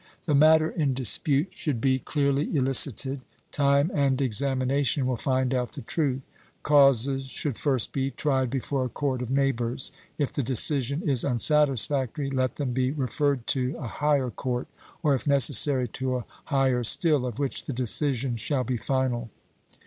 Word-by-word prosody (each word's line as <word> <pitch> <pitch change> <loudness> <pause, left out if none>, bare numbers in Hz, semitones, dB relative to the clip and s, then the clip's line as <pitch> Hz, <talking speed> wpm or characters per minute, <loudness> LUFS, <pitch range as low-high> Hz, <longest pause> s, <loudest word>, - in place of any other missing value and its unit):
The 150 - 0
matter 155 +2 +5
in 145 -6 -1
dispute 140 - +2
should 145 -10 -3
be 130 +2 +1
clearly 140 +2 -1
elicited; 135 0 +2 0.3
time 140 +2 +2
and 140 -2 +1
examination 135 +2 0
will 130 0 0
find 130 +1 -1
out 125 -2 -2
the - - -8
truth. 135 0 -2 0.4
Causes 135 -2 +3
should 135 0 -3
first 130 -4 +1
be 135 0 -2
tried 135 -3 -1
before 135 +1 -2
a - - -4
court 130 0 -3
of 125 - -5
neighbours: 130 -2 -1 0.3
if 145 -3 -2
the - - -1
decision 135 +4 0
is 135 -5 +1
unsatisfactory, 140 +1 +1
let 130 -2 -1
them 135 -4 -3
be 130 0 0
referred 140 -1 -1
to 130 +2 -2
a 150 - -7
higher 140 -1 0
court; 125 0 -4 0.4
or, 150 -3 +3
if 135 - -3
necessary, 140 -1 +4
to 130 +2 -3
a 125 - -4 0.2
higher 135 -4 +1
still, 150 +3 +3
of 120 -2 -6
which 140 -2 -3
the - - -4
decision 130 0 0
shall 130 +4 -1
be 125 +1 -2
final. 125 -2 -2
135 Hz, 160 wpm, -26 LUFS, 125-145 Hz, 0.4 s, matter